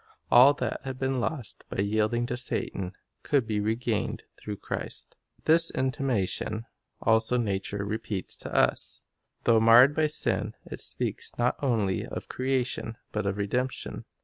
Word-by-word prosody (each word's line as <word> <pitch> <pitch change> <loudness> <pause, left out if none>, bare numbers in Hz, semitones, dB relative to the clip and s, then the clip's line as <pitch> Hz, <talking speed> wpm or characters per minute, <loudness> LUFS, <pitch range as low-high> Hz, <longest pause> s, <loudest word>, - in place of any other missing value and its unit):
All 130 +4 +8
that - - -3
had 130 -1 -5
been 130 0 -1
lost 125 - -4
by 100 - -1
yielding 110 +3 +1
to 120 - -3
Satan 100 -6 -3 0.3
could 140 -5 +1
be 110 -2 -1
regained 110 +1 -1
through 105 -1 -7
Christ. - - -5 0.3
This 165 +1 +6
intimation 125 -4 -1 0.4
also 110 +2 +3
nature 100 -2 -2
repeats 105 -2 -3
to - - -6
us. - - +1 0.4
Though 115 -2 +5
marred 120 +5 +7
by 155 -1 +3
sin, 150 - 0
it - - -7
speaks - - +1
not 120 +1 +2
only 110 -9 +1
of - - -7
creation 130 -3 -2
but 105 -2 -2
of 100 0 -1
redemption. 125 +6 -2
115 Hz, 145 wpm, -28 LUFS, 105-130 Hz, 0.4 s, All